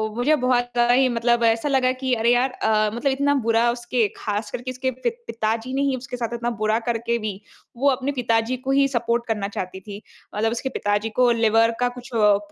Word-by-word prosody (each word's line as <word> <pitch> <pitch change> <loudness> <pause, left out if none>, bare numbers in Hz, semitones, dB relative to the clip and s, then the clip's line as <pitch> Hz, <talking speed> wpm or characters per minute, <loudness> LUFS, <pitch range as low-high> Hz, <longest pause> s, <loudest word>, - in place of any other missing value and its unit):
मुझे 275 +6 +3
बहुत 245 -1 0
आई 245 +2 +4
मतलब 235 0 +1
ऐसा 225 +5 +2
लगा 260 -2 +2
कि 260 0 -2
अरे 230 +1 +2
यार 255 +2 +2
अ, 215 -3 +1
मतलब 270 +4 0
इतना 280 +2 +1
बुरा 230 +1 +3
उसके 240 -2 0
ख़ास 210 0 -3
करके 255 +1 -5
उसके 260 +1 -2
पि 255 - -2 0.2
पिताजी 230 +2 -2
ने 275 - 0
ही 275 -2 +1
उसके 250 0 -7
साथ 235 -1 -3
इतना 235 0 -2
बुरा 215 +1 +2
करके 235 0 0
भी 215 -1 -3 0.5
वो 280 +3 +3
अपने 270 +1 -1
पिताजी 235 -1 0
को 265 +2 -3
ही 275 0 +4
सपोर्ट 235 -2 -1
करना 210 -3 -1
चाहती 190 -1 -6
थी। 205 +1 -9 0.3
मतलब 225 +2 +1
उसके 240 +3 -3
पिताजी 205 -2 -1
को 250 -1 +5
लिवर 225 0 +3
का 245 0 +2
कुछ 250 +2 -10
अ, 210 -2 +4
240 Hz, 210 wpm, -23 LUFS, 225-255 Hz, 0.5 s, को